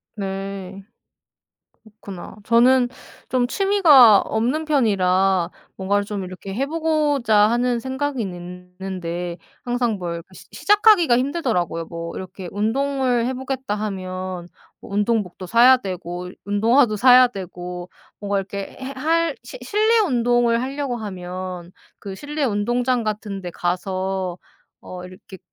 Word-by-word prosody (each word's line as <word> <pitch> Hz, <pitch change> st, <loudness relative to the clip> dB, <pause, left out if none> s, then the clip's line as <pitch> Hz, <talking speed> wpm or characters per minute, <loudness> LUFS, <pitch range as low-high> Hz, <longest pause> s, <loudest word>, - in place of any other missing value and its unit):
네. 195 Hz, -1 st, -5 dB, 1.2 s
그렇구나. 190 Hz, -3 st, -8 dB
저는 245 Hz, +2 st, +4 dB, 0.4 s
좀 250 Hz, -1 st, +1 dB
취미가 300 Hz, -, +6 dB
없는 245 Hz, +8 st, -1 dB
편이라 195 Hz, -, +2 dB, 0.3 s
뭔가를 200 Hz, +1 st, 0 dB
좀 200 Hz, -2 st, -4 dB
이렇게 185 Hz, +1 st, -8 dB
해 260 Hz, +8 st, -1 dB
보고자 300 Hz, -7 st, +1 dB
하는 240 Hz, +1 st, +1 dB
생각은 265 Hz, +2 st, -3 dB
있는데 180 Hz, -2 st, -6 dB, 0.3 s
항상 245 Hz, -1 st, 0 dB
뭘 170 Hz, -1 st, -4 dB
시 -, -, -14 dB
시작하기가 410 Hz, -, +4 dB
힘들더라고요. 240 Hz, -, -1 dB
뭐 170 Hz, 0 st, -7 dB
이렇게 185 Hz, -1 st, -7 dB
'운동을 250 Hz, +3 st, 0 dB
해 260 Hz, -, -2 dB
보겠다.' 265 Hz, -4 st, -3 dB
하면 185 Hz, -3 st, -5 dB, 0.3 s
뭐 -, -, -12 dB
운동복도 205 Hz, -3 st, -1 dB
사야 240 Hz, +6 st, +6 dB
되고 180 Hz, -4 st, -6 dB, 0.2 s
운동화도 220 Hz, +3 st, +3 dB
사야 250 Hz, +2 st, +7 dB
되고 180 Hz, -4 st, -7 dB, 0.3 s
뭔가 200 Hz, -1 st, -1 dB
이렇게 195 Hz, 0 st, -6 dB
해 265 Hz, +1 st, -5 dB
할 325 Hz, +2 st, +1 dB
실 240 Hz, -, -10 dB
실내 430 Hz, -, +2 dB
운동을 240 Hz, -, +2 dB
하려고 270 Hz, -1 st, -3 dB
하면 185 Hz, -4 st, -6 dB, 0.3 s
그 195 Hz, -1 st, -7 dB
실내 295 Hz, +5 st, -5 dB
운동장 240 Hz, +2 st, 0 dB
같은 210 Hz, -2 st, -4 dB
데 180 Hz, -2 st, -6 dB
가서 185 Hz, +1 st, -2 dB, 0.4 s
어 180 Hz, 0 st, -9 dB
이렇게 185 Hz, +1 st, -12 dB
210 Hz, 265 characters per minute, -22 LUFS, 185-255 Hz, 1.2 s, 사야